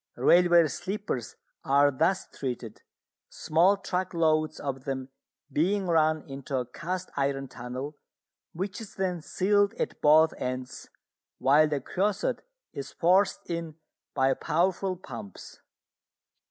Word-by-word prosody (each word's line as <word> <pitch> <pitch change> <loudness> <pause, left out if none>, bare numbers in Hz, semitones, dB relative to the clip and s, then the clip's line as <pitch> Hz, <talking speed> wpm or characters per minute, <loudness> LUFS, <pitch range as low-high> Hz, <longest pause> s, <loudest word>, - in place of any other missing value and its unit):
Railway 170 +5 +5
sleepers 185 - -4 0.3
are 140 +1 +4
thus 165 +8 +1
treated, 130 -4 -6 0.5
small 170 +5 +3
truck 185 -2 -3
loads 155 -2 +1
of 135 -2 -5
them 130 -1 -4 0.4
being 190 +7 +1
run 155 -2 +2
into 135 0 -4
a 125 - -1
cast 180 +7 -5
iron 135 0 -1
tunnel 130 +4 -7 0.5
which 195 +6 -4
is 220 - -10
then 180 -3 -2
sealed 200 +5 +1
at - - -4
both 155 +2 +6
ends, 130 0 -5 0.5
while 150 +3 +5
the 150 -2 -1
creosote 200 +8 -1 0.3
is 140 - -6
forced 190 +3 +2
in 165 -2 -4 0.4
by 135 -1 +3
powerful 185 +5 0
pumps. 115 - -10
155 Hz, 120 wpm, -28 LUFS, 135-185 Hz, 0.5 s, both